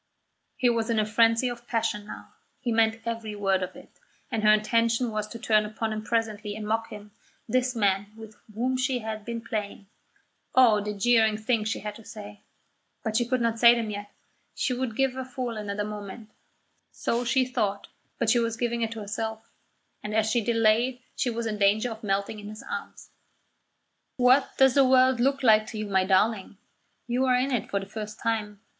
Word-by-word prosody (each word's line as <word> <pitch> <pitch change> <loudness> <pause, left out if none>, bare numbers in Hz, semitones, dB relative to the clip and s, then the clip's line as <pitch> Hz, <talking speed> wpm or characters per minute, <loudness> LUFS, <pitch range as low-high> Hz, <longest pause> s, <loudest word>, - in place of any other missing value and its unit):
He 255 - +2
was 230 -1 +1
in 230 - +1
a 215 - +2
frenzy 230 +3 +3
of 240 0 -6
passion 210 -3 -1
now; - - -10 0.3
he 250 -3 -2
meant 225 0 +2
every 230 -2 -4
word 195 -2 +1
of 185 - -5
it; - - -16 0.3
and 225 -3 -1
her 215 0 +5
intention 230 +2 +2
was 215 -1 -3
to 230 - -8
turn 220 -2 +2
upon 220 +1 -3
him 215 0 -4
presently 215 -2 -2
and 215 -1 -6
mock 225 +1 -1
him, 210 0 -10 0.4
this 250 +1 0
man 200 -2 +1
with 220 -1 -11 0.2
whom 255 +3 0
she 255 0 0
had 220 -2 -5
been 235 +1 -5
playing. 210 -3 -5 0.7
Oh, 235 -5 +6
the 210 0 -4
jeering 220 0 +3
things 220 0 0
she - - -3
had 210 0 -5
to 225 - -14
say! 210 -1 -10 0.6
But 220 -1 -2
she 240 0 +2
could 255 0 0
not 230 -1 0
say 235 0 +8
them 225 -2 -2
yet; 205 0 -6 0.5
she 255 - 0
would 245 -3 -3
give 270 0 +1
her 260 0 -4
fool 250 -2 -5
another 210 -1 -3
moment 210 +1 -8 0.6
so 235 +1 -1
she 255 +2 +2
thought, 205 -5 -2 0.3
but 235 - -1
she 240 - +4
was 230 -1 -1
giving 235 0 -1
it 225 - 0
to 225 - -7
herself; 220 +2 -5 0.5
and 210 0 -5
as 220 0 +2
she 235 +2 +2
delayed 230 +2 +2 0.2
she 250 - 0
was 235 0 -3
in 210 -2 -3
danger 215 +4 +3
of 220 +1 -9
melting 200 +1 -1
in 205 0 -8
his 215 +1 -9
arms. - - -7 1.1
"What 255 +2 +3
does 265 -1 +5
the 275 - +5
world 255 -1 +4
look 275 +2 +1
like 215 -2 +5
to 220 - -7
you, 215 - -3
my 190 -2 +1
darling? 195 +1 +1 0.5
You 250 +2 0
are 255 -1 +3
in 255 +2 +1
it 245 - -1
for 200 - 0
the 195 - -7
first 210 +1 -7
time. 215 -3 -2
225 Hz, 200 wpm, -26 LUFS, 210-240 Hz, 1.1 s, say